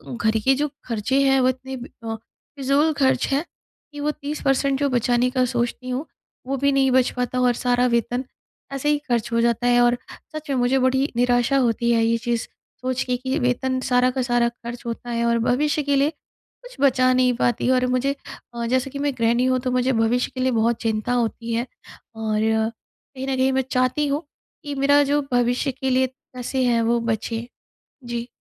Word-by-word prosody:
घर 220 Hz, -1 st, +1 dB
के 270 Hz, 0 st, +5 dB
जो 295 Hz, +2 st, 0 dB, 0.2 s
ख़र्चे 240 Hz, +4 st, 0 dB
हैं 270 Hz, -1 st, +4 dB
वो 255 Hz, -, +4 dB
इतने 260 Hz, +1 st, -5 dB, 0.3 s
अ, 225 Hz, 0 st, -3 dB
फ़िज़ूल 275 Hz, +6 st, -1 dB
ख़र्च 270 Hz, -2 st, +2 dB
हैं 280 Hz, +4 st, +1 dB, 0.5 s
कि 290 Hz, -, -8 dB
वो 300 Hz, +1 st, 0 dB
30 295 Hz, +1 st, -6 dB
परसेंट 270 Hz, 0 st, +2 dB
जो 285 Hz, -1 st, +1 dB
बचाने 245 Hz, 0 st, +2 dB
का 255 Hz, -1 st, +2 dB
सोचती 245 Hz, +1 st, -2 dB
हूँ 255 Hz, +5 st, -2 dB, 0.4 s
वो 275 Hz, +1 st, -1 dB
भी 280 Hz, +2 st, +2 dB
नहीं 270 Hz, -1 st, +3 dB
बच 255 Hz, 0 st, +3 dB
पाता 250 Hz, 0 st, -1 dB
और 250 Hz, -1 st, +3 dB
सारा 245 Hz, +1 st, +1 dB
वेतन 240 Hz, +2 st, -1 dB, 0.5 s
ऐसे 275 Hz, +2 st, -1 dB
ही 295 Hz, -, +3 dB
ख़र्च 235 Hz, -1 st, 0 dB
हो 230 Hz, -, +2 dB
जाता 235 Hz, +1 st, +1 dB
है। 245 Hz, 0 st, +4 dB
और 240 Hz, 0 st, +3 dB, 0.4 s
सच 310 Hz, -1 st, -7 dB
में 275 Hz, -, +1 dB
मुझे 250 Hz, +2 st, +2 dB
बड़ी 265 Hz, +2 st, +1 dB
निराशा 245 Hz, +2 st, +2 dB
होती 235 Hz, -2 st, +1 dB
है 230 Hz, -1 st, +3 dB
ये 230 Hz, 0 st, +2 dB
चीज़ 235 Hz, -1 st, -2 dB, 0.3 s
सोच 255 Hz, 0 st, -1 dB
के 250 Hz, -1 st, -1 dB
कि 260 Hz, +1 st, -2 dB
वेतन 255 Hz, +1 st, 0 dB
सारा 250 Hz, 0 st, +3 dB
का 260 Hz, -, -2 dB
सारा 240 Hz, -1 st, +2 dB
ख़र्च 240 Hz, 0 st, -9 dB
होता 235 Hz, +1 st, -5 dB
है 235 Hz, 0 st, 0 dB
और 235 Hz, 0 st, +2 dB
भविष्य 290 Hz, +6 st, +1 dB
के 285 Hz, 0 st, +1 dB
लिए 280 Hz, +2 st, +3 dB, 0.5 s
कुछ -, -, -12 dB
बचा 255 Hz, -2 st, +4 dB
नहीं 255 Hz, 0 st, +3 dB
पाती। 240 Hz, +1 st, 0 dB
और 255 Hz, -1 st, +3 dB
मुझे 255 Hz, +2 st, 0 dB, 0.5 s
जैसे 260 Hz, +2 st, +1 dB
कि 280 Hz, +1 st, -7 dB
मैं 285 Hz, -1 st, 0 dB
गृहणी 235 Hz, +2 st, +2 dB
हूँ 255 Hz, 0 st, +2 dB
तो 255 Hz, 0 st, -2 dB
मुझे 255 Hz, +1 st, +1 dB
भविष्य 230 Hz, +2 st, +1 dB
के -, -, -5 dB
लिए 260 Hz, 0 st, +2 dB
बहुत 230 Hz, 0 st, +1 dB
चिंता 225 Hz, +1 st, -1 dB
होती 230 Hz, -1 st, -1 dB
है। 235 Hz, +2 st, 0 dB, 0.5 s
और 220 Hz, -1 st, -1 dB
कहीं 225 Hz, +4 st, -3 dB
न 270 Hz, -, 0 dB
कहीं 260 Hz, +1 st, +3 dB
मैं 265 Hz, -, +2 dB
चाहती 255 Hz, +4 st, +1 dB
हूँ 285 Hz, +3 st, -1 dB, 0.4 s
कि 290 Hz, -2 st, -5 dB
मेरा 285 Hz, +1 st, +4 dB
जो 290 Hz, +1 st, +1 dB
भविष्य 245 Hz, +3 st, +1 dB
के 265 Hz, +1 st, -3 dB
लिए 260 Hz, 0 st, +3 dB, 0.3 s
पैसे 255 Hz, +1 st, -2 dB
हैं 235 Hz, -1 st, +2 dB
वो 235 Hz, +1 st, +2 dB
बचे। 230 Hz, +1 st, -2 dB, 0.6 s
जी। 240 Hz, 0 st, -4 dB
250 Hz, 205 wpm, -22 LUFS, 235-270 Hz, 0.6 s, के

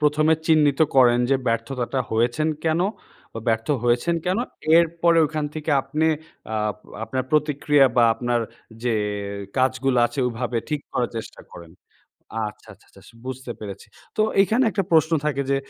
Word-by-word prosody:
১ম, 150 Hz, 0 st, +2 dB
এ -, -, +6 dB
চিহ্নিত 150 Hz, -3 st, +3 dB, 0.2 s
করেন 120 Hz, -2 st, +6 dB
যে 135 Hz, -, +5 dB
ব্যর্থতাটা 120 Hz, +3 st, -1 dB
হয়েছেন 120 Hz, +7 st, +1 dB, 0.2 s
কেনো? 165 Hz, +3 st, +2 dB, 0.5 s
বা 115 Hz, -, -6 dB
ব্যর্থ 110 Hz, 0 st, 0 dB, 0.2 s
হয়েছেন 120 Hz, +8 st, +2 dB
কেনো? 185 Hz, +7 st, 0 dB, 0.3 s
এরপরে 170 Hz, 0 st, +3 dB
ওখান 155 Hz, 0 st, -3 dB
থেকে 155 Hz, 0 st, -4 dB
আপনে 150 Hz, +4 st, -1 dB, 0.4 s
অ্যা 110 Hz, -, -3 dB, 0.5 s
আপনার 130 Hz, +2 st, -3 dB
প্রতিক্রিয়া 145 Hz, -2 st, +3 dB
বা 120 Hz, -, +6 dB
আপনার 120 Hz, +1 st, -1 dB, 0.4 s
যে 120 Hz, -1 st, +1 dB, 0.6 s
কাজগুলো 130 Hz, 0 st, +1 dB
আছে 140 Hz, -, -11 dB
ওভাবে 120 Hz, 0 st, -3 dB
ঠিক 150 Hz, -2 st, -2 dB
করার 125 Hz, -2 st, -1 dB
চেষ্টা 110 Hz, -, -7 dB
করেন। 85 Hz, -1 st, -11 dB, 0.8 s
আচ্ছা, -, -, -23 dB
আচ্ছা, -, -, -27 dB
আচ্ছা -, -, -19 dB, 0.2 s
বুঝতে 130 Hz, -1 st, -6 dB
পেরেছি। 100 Hz, -2 st, -8 dB, 0.3 s
তো 215 Hz, -, +3 dB, 0.2 s
এখানে 225 Hz, +6 st, +2 dB
একটা 195 Hz, -3 st, -1 dB
প্রশ্ন 160 Hz, 0 st, +4 dB
থাকে 140 Hz, -2 st, 0 dB
যে, 140 Hz, -, +3 dB
135 Hz, 155 wpm, -23 LUFS, 120-155 Hz, 0.8 s, এ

